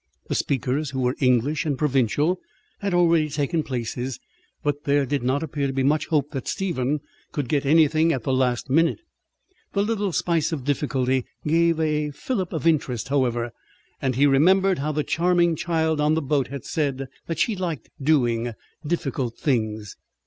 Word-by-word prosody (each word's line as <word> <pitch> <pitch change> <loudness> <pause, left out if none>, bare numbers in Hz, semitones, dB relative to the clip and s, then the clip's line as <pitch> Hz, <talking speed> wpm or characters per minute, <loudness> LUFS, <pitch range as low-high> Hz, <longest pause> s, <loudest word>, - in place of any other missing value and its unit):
The - - 0
speakers, 140 +2 0
who 135 -1 -4
were 125 +1 +1
English 130 +3 +2
and 145 -4 -1
provincial, 145 +5 +1 0.4
had 200 -1 -2
already 170 -3 +3
taken 150 +3 0
places, 125 -1 -4 0.4
but 145 0 -1
there 140 0 +3
did 140 +2 -1
not 130 +5 0
appear 145 -3 -2
to 135 - -3
be 135 0 0
much 150 +3 +2
hope 150 -3 0
that 135 -4 -5
Stephen 150 -6 -1 0.3
could 145 -6 -2
get 140 0 0
anything 160 +1 +4
at 130 -7 -2
the 135 - 0
last 125 -2 +1
minute. 165 - +2 0.7
The 200 - +2
little 205 -2 -1
spice 165 -1 0
of 150 -5 -3
difficulty 130 -2 0 0.2
gave 165 +1 +3
a 150 -1 0
fillip 185 - -3
of 160 -1 -4
interest, 135 -9 +1
however; 120 -4 0 0.5
and 130 -2 0
he 140 +3 +4
remembered 185 +6 +4
how 150 +2 -1
the 150 0 -1
charming 175 0 +2
child 160 -2 0
on 150 +1 +3
the 160 - 0
boat 140 -2 +1
had 140 -1 -7
said 135 -3 -1 0.2
that 165 - -3
she 215 +6 +1
"liked 170 - -4
doing 120 -5 +2 0.3
difficult 135 -7 -2
things." 110 - -1
145 Hz, 170 wpm, -24 LUFS, 130-160 Hz, 0.7 s, anything